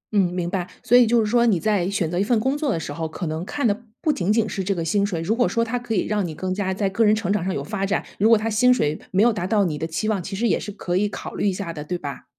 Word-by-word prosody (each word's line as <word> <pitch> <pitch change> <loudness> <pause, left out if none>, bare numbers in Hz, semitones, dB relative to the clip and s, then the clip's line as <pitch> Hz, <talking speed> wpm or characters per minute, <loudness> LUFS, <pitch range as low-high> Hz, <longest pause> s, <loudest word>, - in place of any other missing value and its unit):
嗯， 185 -3 +3
明 180 -1 -2
白， 180 -1 -3
所 245 - +3
以 245 -2 +7
就 235 +1 +3
是 220 - +2
说 235 +3 +3
你 195 -7 +3
在 200 -3 +1
选 180 -5 -1
择 175 - -1
一 195 - +3
份 225 +1 +2
工 265 +5 0
作 290 -3 -1
的 165 - -1
时 145 -2 -5
候， 160 +1 -3
可 165 +3 -6
能 160 +1 -3
看 285 +7 -3
的 205 - +3 0.2
不 310 -3 +1
仅 195 -6 0
仅 225 0 +2
是 195 -1 -3
这 195 +1 -1
个 165 -2 -3
薪 200 +5 +1
水。 190 -5 -1
如 210 +7 0
果 245 - +2
说 230 - +1
它 245 +2 -2
可 235 -2 -3
以 180 - +1
让 210 -2 0
你 155 - -7
更 185 +2 -3
加 190 -1 -1
在 195 +1 0
个 195 +4 +1
人 215 0 +5
成 205 -3 -1
长 205 -4 0
上 190 - -1
有 - - -3
发 205 -1 -4
展， 195 +1 0
如 215 +3 +4
果 230 - +7
它 215 - -2
薪 225 +3 +4
水 155 -11 +1
没 195 +3 +3
有 235 - +4
达 180 -3 -3
到 205 -1 +2
你 155 - -1
的 160 - -2
期 165 +7 -3
望， 200 -4 0
其 195 - -6
实 235 +4 0
也 - - +2
是 205 - -6
可 180 -3 -2
以 205 +2 +1
考 - - -7
虑 - - -1
一 - - +1
下 180 -3 -5
的， 150 - -6
对 180 +4 -3
吧？ 145 -4 -7
200 Hz, 370 characters per minute, -23 LUFS, 180-220 Hz, 0.2 s, 以